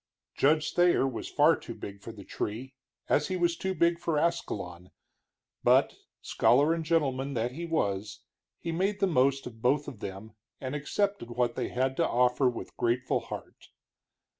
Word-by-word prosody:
Judge 150 +2 +2
Thayer 175 -6 +4
was 125 -4 -5
far - - +5
too - - -9
big 100 0 -9
for 115 - -8
the 105 -3 -11
tree, 120 +8 -5 0.3
as 150 - +2
he 185 - -2
was 175 -1 +1
too 190 +2 -3
big 170 -1 +2
for 165 -2 -1
Ascalon, 95 - -2 0.7
but, - - +4 0.3
scholar 145 +6 +3
and 165 -1 -2
gentleman 140 -4 0
that 120 +1 -1
he 170 +6 -6
was, 100 -10 -2 0.3
he 165 - -4
made 195 +5 0
the - - +3
most 135 -5 +2
of 115 -2 -10
both 140 +4 +2
of 130 -7 -8
them 100 +3 -7 0.3
and 130 0 -5
accepted 150 - -1
what 120 0 0
they - - -3
had 130 +1 0
to - - +2
offer 125 +2 +3
with 120 - -7
grateful 120 +2 +1
heart. - - -9
135 Hz, 170 wpm, -29 LUFS, 120-165 Hz, 0.7 s, far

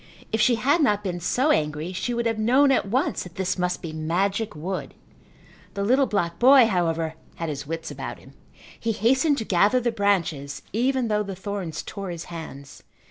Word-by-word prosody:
If 220 - +1
she 240 +1 +4
had 280 +9 +2
not 210 -7 +2
been 180 -3 -3
so 260 - +1
angry 155 - -1
she 215 +6 -2
would 235 0 -1
have 225 -1 0
known 260 +6 +4
at 255 - +2
once 255 +8 0
that 180 -1 -9
this 190 0 -1
must 180 +1 -1
be 160 -2 -5
magic 190 +6 -1
wood. 180 +5 -5 0.8
The 200 - -1
little 260 +6 +3
black 170 -5 -1
boy, 260 0 +8
however, 165 -5 0 0.2
had 165 -1 -4
his 145 -1 -5
wits 165 +1 -5
about - - -6
him. - - -17 0.5
He 225 0 -1
hastened 265 +8 +2
to 225 - -3
gather 205 +7 +3
the 240 -1 0
branches 175 -10 -1
even 255 +2 +1
though 210 -1 +1
the 195 -2 -5
thorns 190 -4 -5
tore 195 -2 -6
his 170 -1 -5
hands. 140 -4 -9
200 Hz, 190 wpm, -24 LUFS, 170-235 Hz, 0.8 s, boy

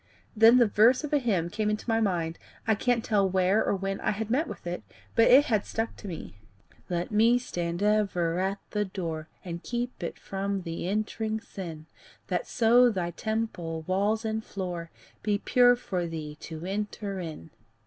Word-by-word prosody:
Then 225 +3 +7
the 245 - +6
verse 230 +6 +4
of 300 - -4
a 295 - +5
hymn 190 -9 0
came 210 0 0
into 210 +2 -3
my 225 -1 +2
mind 170 -5 -1 0.3
I 220 - +4
can't 235 +2 +1
tell 200 -3 +2
where 190 +3 +3
or - - +1
when 195 0 -3
I - - 0
had 220 +1 -2
met 295 +7 +2
with - - -8
it, 175 -5 -3 0.3
but 230 - +5
it 275 +4 +8
had 215 -4 +1
stuck 225 +1 -3
to 205 - -9
me: 100 - -8 0.5
Let 175 +1 -2
me 225 +3 +5
stand 175 -6 -3
ever 195 -5 +2
at 190 +1 0
the 210 -1 +1
door, 165 -5 -5 0.2
And 170 -1 -5
keep 240 +1 -4
it 170 - -4
from 195 0 -3
the 165 0 -4
entering 215 +1 -1
sin, 170 -8 -8 0.4
That - - -1
so 240 +1 +5
thy 180 -6 -2
temple, 175 -6 -3
walls 205 +5 +1
and 220 0 -1
floor, 175 -5 -5 0.3
Be 210 -1 +1
pure 245 +3 +5
for 185 -8 -3
thee 155 -2 -6
to 160 +1 -7
enter 200 0 -3
in. 160 - -7
200 Hz, 185 wpm, -28 LUFS, 175-225 Hz, 0.5 s, it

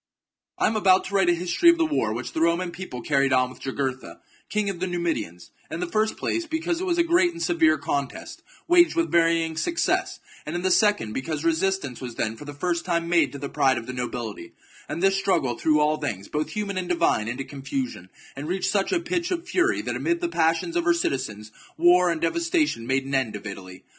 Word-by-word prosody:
I - - +1
am 220 - -1
about 190 -3 +4
to 200 - -7
write 190 -3 +4
a - - +5
history 180 - +3
of 340 - +5
the 330 - +2
war 295 - 0
which 120 +2 -5
the - - -2
^^f^^ - - +3
Roman 170 +1 +1
people 170 -9 -7
carried 140 -2 +2
on 130 -1 +2
with - - -14
Jugurtha, 135 -1 -4 0.3
king 210 -1 0
of 195 -3 -3
the 185 - -1
Numidians, 165 - -3 0.2
in 165 - -5
the 180 - -1
first 215 +5 0
place 335 0 -2
because 325 +2 -2
it 375 - -2
was 350 -1 +1
a 340 - +4
great 345 +1 +3
and 335 - -8
severe 330 -3 +3
contest, 145 - -4 0.3
waged 345 0 +5
with 335 0 0
varying 165 -1 +2
success; 335 - 0 0.2
and 155 - -5
in 175 - -2
the 185 - +2
second, 205 - +2
because 150 +4 -3
resistance 165 -5 0
was 125 -3 -6
then 110 0 -2
for 130 - -11
the 145 - -7
first 170 +3 -1
time 170 -1 -1
made 170 -1 +3
to - - -6
the 140 0 -5
pride 135 -2 +2
of 115 - -5
the 130 - -6
nobility, 120 -7 -5 0.4
and 170 - -3
this 195 0 +4
struggle 175 -11 +1
threw 150 +4 +2
all 150 +1 +2
things, 110 -10 -4
both 150 +1 -2
human 200 -3 -3
and 180 -1 -5
divine, 170 -11 +1
into 125 +4 -3
confusion, 135 -9 -5 0.3
and 140 +2 -6
reached 185 +2 -1
such 200 -2 0
a 365 - +2
pitch 345 0 -2
of 360 -1 -3
fury 370 0 +1
that - - -3
amid 340 0 0
the 345 - -1
passions 165 - 0
of 175 - +1
her 170 0 +3
citizens 110 -9 -3 0.3
war 175 +2 +5
and 165 -2 -1
devastation 320 - 0
made 135 0 +1
an 135 - -6
end 130 -6 0
of 105 - -8
Italy. 95 -2 -8
170 Hz, 230 wpm, -25 LUFS, 135-210 Hz, 0.4 s, a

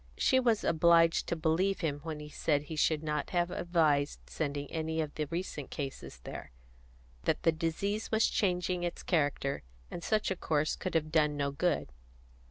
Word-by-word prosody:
She 260 - +4
was 235 -4 +2
obliged 165 0 +4
to - - 0
believe 170 +5 +1
him 145 -4 -1
when 155 0 -5
he 150 0 -8
said 150 -1 0
he 155 +2 -6
should 155 0 +2
not 150 -2 -2
have 175 -1 0
advised 155 -5 +1
sending 145 -2 -3
any 160 0 -2
of 155 -2 -2
the 155 - -2
recent 165 -3 -4
cases 135 - -6
there; - - -7 0.8
that - - +1
the 165 - +5
disease 170 +7 -2
was 220 0 +3
changing 180 -2 0
its 175 -1 -3
character, 145 -4 0 0.3
and 170 - -6
such 215 -2 +1
a - - +1
course 155 -3 0
could 185 - -4
have 155 -1 +1
done 150 -2 +3
no 140 -1 0
good. 140 - 0
160 Hz, 180 wpm, -31 LUFS, 150-175 Hz, 0.8 s, the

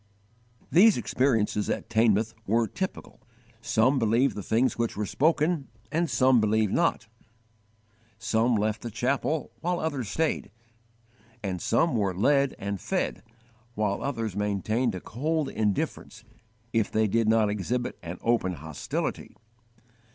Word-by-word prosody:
These 205 +5 +6
experiences 110 -5 +1
at - - -2
Teignmouth 110 0 +2
were 115 +3 +3
typical: 190 - -6 0.4
"Some 130 +5 +2
believed 115 +4 +2
the 105 - -4
things 115 +6 +1
which 115 -3 -2
were 105 - -1
spoken, 155 - +1 0.2
and 165 +1 0
some 130 -3 +4
believed 110 -1 +1
not;" 170 -10 +1 1.1
some 115 +1 +1
left 105 0 0
the 120 - -5
chapel, 135 +6 -1
while 175 +1 -1
others 140 -9 -2
stayed; 160 -1 -1 0.9
and 95 -3 -3
some 135 +4 +2
were 100 -5 0
led 140 +5 +3
and 100 -1 -4
fed, - - -2 0.5
while 105 -2 -1
others 115 -8 -3
maintained 105 +3 0
a 90 - -6
cold 150 +5 -2
indifference, 105 -3 -2 0.5
if 115 -3 +1
they 110 0 +2
did 115 +2 +1
not 110 -2 +3
exhibit 115 +5 -2
an 85 +1 -6
open 115 -6 +1
hostility. 80 -2 -5
115 Hz, 130 wpm, -27 LUFS, 105-135 Hz, 1.1 s, These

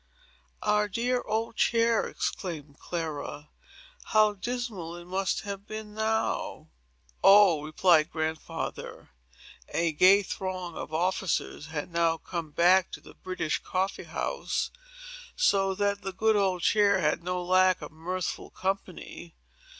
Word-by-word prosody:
"Our 210 0 +2
dear 245 +5 0
old 220 +2 -2
chair!" 230 -1 +3
exclaimed 150 -6 -5
Clara. 155 -3 -5 0.6
"How 215 -1 +4
dismal 205 -6 -4
it 175 0 -10
must 190 +1 -1
have 200 0 -7
been 215 -1 -7
now!" 220 +1 -1 0.5
"Oh," 195 -5 +7
replied 155 +1 +3
Grandfather, 160 - -5 0.6
"a 170 -1 0
gay 185 +6 +6
throng 185 -2 -5
of - - -6
officers 175 -2 -1
had 160 +1 -5
now 165 -1 +2
come 165 -1 -5
back 180 +4 +4
to - - -6
the - - -15
British 185 -4 -3
Coffee 190 +1 -2
House; - - -2 0.6
so 195 - +2
that 200 0 0
the 195 -1 -5
old 200 -5 +2
chair 205 -2 +4
had 155 0 0
no 180 +1 -2
lack 185 +1 +4
of 150 - -8
mirthful 175 +3 -4
company. 185 -3 -5
185 Hz, 125 wpm, -28 LUFS, 170-205 Hz, 0.6 s, Oh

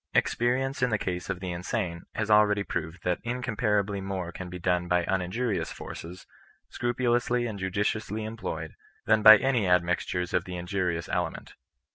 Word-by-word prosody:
Experience 130 +3 +1
in 125 - +3
the 110 - +1
case 90 -2 -4
of 95 -2 -2
the 90 -2 -3
in 85 0 -5
sane 90 -4 -3
has 110 0 -1
already 105 -1 +5
proved 80 -1 -5
that 90 -1 0
incomparably 105 -5 -1
more 95 -3 -4
can 90 +1 -7
be 90 - -6
done 90 0 0
by 90 -1 +2
uninjurious 95 +5 -1
forces, 90 +3 -8 0.4
scrupulously 120 0 0
and 110 -4 -4
judiciously 105 +3 -1
employed, 110 +1 -5 0.3
than 110 0 +4
by 110 0 +11
any 125 -3 +1
a^nixtures 90 0 +1
of 90 - +1
the 90 -1 -5
injurious 90 -2 -2
ele 90 -2 0
ment. - - -11
100 Hz, 165 wpm, -28 LUFS, 90-110 Hz, 0.4 s, by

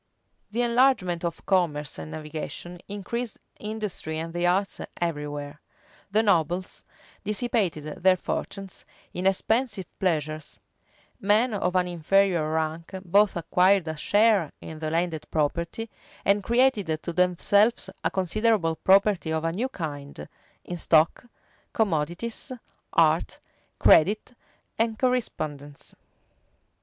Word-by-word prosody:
The 235 +4 0
enlargement 235 -8 +2
of 170 -1 -4
commerce 150 - 0
and 80 -1 -7
navigation 155 - -6
increased 205 +3 -4 0.2
industry 210 -7 -4
and 165 +1 -5
the 175 0 +1
arts 195 +3 0 0.2
every 155 -4 -1
where; 145 0 -7 0.5
the 215 +3 +2
nobles 180 -2 0 0.4
dissipated 210 - 0 0.2
their 185 0 +5
fortunes 195 +1 -5 0.3
in 180 +1 0
expensive 210 +1 +1
pleasures: 155 -4 -2 0.6
men 215 +4 +3
of 185 -3 -1
an 180 -1 +3
inferior 175 -1 +2
rank 160 +1 -2
both 200 +3 +4
acquired 180 +2 +3
a 160 - -3
share 205 +1 +3
in 160 -1 -9
the 155 0 -2
landed 165 -1 -1
property, 170 +8 -1 0.4
and 200 +1 +3
created 225 -10 +2
to 170 - -4
themselves 195 +6 +3 0.2
a - - +2
considerable 190 -2 +1
property 195 -3 +3
of 160 0 -1
a 165 - +1
new 230 +10 -2
kind, 145 - -6 0.4
in 175 - -5
stock, 160 +5 +3 0.5
commodities, 195 - -1 0.4
art, - - +2 0.4
credit, 205 +9 +4 0.5
and 225 -1 +1
correspondence. 155 - -2
180 Hz, 115 wpm, -26 LUFS, 160-210 Hz, 0.6 s, their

